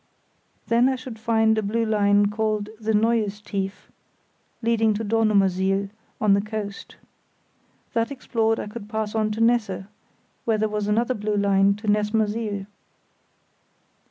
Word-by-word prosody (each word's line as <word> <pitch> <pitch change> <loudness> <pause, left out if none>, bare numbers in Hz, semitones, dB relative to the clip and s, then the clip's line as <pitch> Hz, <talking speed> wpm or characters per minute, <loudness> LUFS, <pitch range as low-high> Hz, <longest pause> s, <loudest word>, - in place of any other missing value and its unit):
Then 235 +2 +3
I 265 - 0
should 255 -3 -9
find 220 -1 +2
a 220 - +1
blue 225 +3 0
line 205 -1 +3
called 215 -1 -1
the 220 0 -1
Neues 215 -1 +1
Tief 200 -2 -5 0.7
leading 225 -2 +2
to 220 - -3
Dornumersiel, 200 -3 +2 0.3
on 210 -2 +4
the 200 - +3
coast. 210 -1 -6 1.0
That 230 0 +1
explored, 225 -5 0
I - - -4
could 210 0 -9
pass 220 -1 -2
on 215 -1 +1
to 220 - -3
Nesse, 225 -5 +2 0.6
where 225 -2 +1
there 215 +1 +1
was 210 -1 -2
another 235 +4 +1
blue 210 -2 -2
line 200 0 +3
to 210 +1 -9
Nessmersiel. 210 -1 0
215 Hz, 140 wpm, -24 LUFS, 205-225 Hz, 1.0 s, on